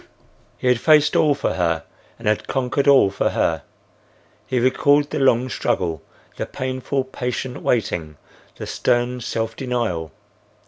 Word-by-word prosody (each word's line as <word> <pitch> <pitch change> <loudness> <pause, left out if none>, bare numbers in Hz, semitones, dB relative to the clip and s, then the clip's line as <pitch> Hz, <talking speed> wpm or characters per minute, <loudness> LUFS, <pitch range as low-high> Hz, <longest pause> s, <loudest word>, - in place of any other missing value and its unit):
He - - -8
had 125 -2 +3
faced 155 +2 +4
all 150 -2 +4
for - - -1
her 85 -2 0 0.3
and 115 - -7
had 105 0 +1
conquered 135 +2 -1
all 135 -8 +6
for - - 0
her. 80 -2 0 0.9
He 130 - -1
recalled 145 +4 +3
the - - -1
long 130 -2 +3
struggle, 85 -8 -1 0.4
the - - -3
painful, 130 +1 -2
patient 125 -1 -4
waiting, 85 -10 -1 0.4
the - - -7
stern 120 +1 0
self 115 0 -3
denial. 115 -12 -2
125 Hz, 140 wpm, -21 LUFS, 100-130 Hz, 0.9 s, all